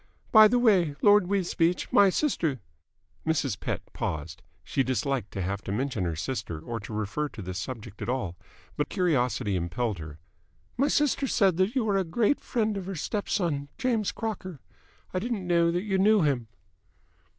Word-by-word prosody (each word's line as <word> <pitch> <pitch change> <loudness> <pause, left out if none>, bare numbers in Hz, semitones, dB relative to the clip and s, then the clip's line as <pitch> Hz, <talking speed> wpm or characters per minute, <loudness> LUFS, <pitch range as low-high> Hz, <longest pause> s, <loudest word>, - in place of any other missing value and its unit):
By 215 -1 +9
the 245 +3 +2
way, 190 -11 +3
Lord 205 -3 +6
Wisbeach, 180 -3 0
my 200 -1 +7
sister 170 - 0 0.3
" - - -25
Mrs. 140 -9 0
Pett - - -3
paused; 80 +1 -4 0.2
she 135 - 0
disliked 130 -3 -1
to 95 - -2
have 100 +2 -2
to - - -3
mention 120 -2 -1
her 85 -2 -2
sister 85 - -4
or 115 +8 -5
to 105 - -9
refer 110 +8 -2
to 115 - -9
this 90 +1 -4
subject 105 -1 -7
at - - -3
all, 120 -9 -2 0.4
but 150 - -1
curiosity 125 - +1
impelled 95 +4 -2
her 75 -2 -8 0.6
"my 275 +3 +2
sister 290 -2 +2
said 195 -8 +3
that 190 +7 +1
you 240 -4 +1
are 200 -2 +2
a 190 - +2
great 215 - +1
friend 220 -4 -1
of 190 -2 -5
her 195 - -4
step 205 +6 -3
son, 150 -8 0
James 240 -6 0
Crocker. 185 - -5 0.5
I 185 - 0
didn't 215 -2 -3
know 170 -1 +3
that 175 +2 -1
you 195 -3 0
knew 210 -1 +5
him." 130 -6 0
160 Hz, 185 wpm, -27 LUFS, -, 0.6 s, By